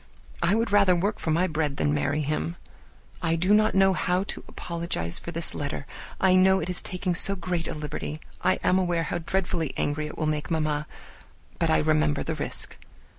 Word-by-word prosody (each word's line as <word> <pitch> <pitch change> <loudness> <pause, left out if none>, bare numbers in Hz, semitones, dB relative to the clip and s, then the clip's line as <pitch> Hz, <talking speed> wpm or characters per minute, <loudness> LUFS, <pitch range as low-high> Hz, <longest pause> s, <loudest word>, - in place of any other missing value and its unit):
I 170 +4 +3
would 230 0 0
rather 195 -3 +5
work 200 +5 -1
for - - -3
my 165 +4 +3
bread 150 -4 -1
than 145 - +1
marry 145 +1 0
him. 150 +3 -2 0.7
I 165 -1 +1
do 180 +5 +2
not 215 -1 +4
know 195 0 +5
how 180 +1 0
to - - -7
apologize 170 - -3
enough - - -17
for 170 - -4
this 165 0 -1
letter; 140 0 -4 0.3
I 190 -1 +4
know 190 +1 +5
it 175 +1 -3
is 180 - 0
taking 180 0 -2
so 195 +3 +5
great 175 -2 -3
a - - -4
liberty. 150 0 -5 0.2
I 95 0 +3
am 185 - +3
aware 175 -2 0
how 175 - -2
dreadfully 175 -2 -1
angry 150 +1 -1
it - - -9
will 155 - -1
make 150 -1 -2
mamma, 155 -2 -1 0.7
but - - +1
I - - +4
remember 75 -1 +2
the - - -2
risk. - - -1
170 Hz, 205 wpm, -26 LUFS, 150-185 Hz, 0.7 s, rather